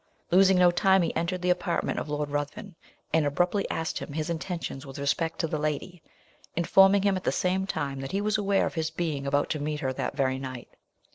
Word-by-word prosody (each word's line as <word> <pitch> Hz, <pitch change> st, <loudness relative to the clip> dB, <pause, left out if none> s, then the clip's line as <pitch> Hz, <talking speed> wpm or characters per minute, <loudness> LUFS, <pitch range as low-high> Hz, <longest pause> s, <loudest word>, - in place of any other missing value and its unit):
Losing 190 Hz, +1 st, +6 dB
no 180 Hz, -1 st, +6 dB
time, 190 Hz, +1 st, +4 dB
he -, -, -2 dB
entered 180 Hz, +1 st, -2 dB
the 180 Hz, -, +3 dB
apartment 175 Hz, -1 st, -1 dB
of -, -, -6 dB
Lord 150 Hz, 0 st, -2 dB
Ruthven, 145 Hz, +7 st, -4 dB, 0.4 s
and 160 Hz, -1 st, +4 dB
abruptly 175 Hz, +7 st, 0 dB
asked 165 Hz, +1 st, -2 dB
him 145 Hz, -, -7 dB
his 155 Hz, +2 st, -2 dB
intentions 165 Hz, -5 st, -4 dB
with 135 Hz, -2 st, -9 dB
respect 155 Hz, +4 st, -1 dB
to 165 Hz, -, 0 dB
the 155 Hz, -1 st, -2 dB
lady, 155 Hz, +3 st, -3 dB, 0.5 s
informing 195 Hz, +3 st, +5 dB
him 200 Hz, -1 st, +3 dB
at 185 Hz, -, -4 dB
the -, -, +1 dB
same 190 Hz, +1 st, 0 dB
time 140 Hz, -6 st, -3 dB
that 135 Hz, 0 st, -5 dB
he 195 Hz, -, 0 dB
was 210 Hz, +1 st, 0 dB
aware 200 Hz, -2 st, +2 dB
of -, -, -3 dB
his 160 Hz, -2 st, -1 dB
being 160 Hz, -4 st, -3 dB
about 145 Hz, +1 st, +1 dB
to 155 Hz, -, -1 dB
meet 150 Hz, +1 st, -3 dB
her 130 Hz, -1 st, -1 dB
that 140 Hz, -, -4 dB
very 130 Hz, -1 st, +1 dB
night. 130 Hz, -2 st, -7 dB
165 Hz, 220 wpm, -27 LUFS, 145-185 Hz, 0.5 s, Losing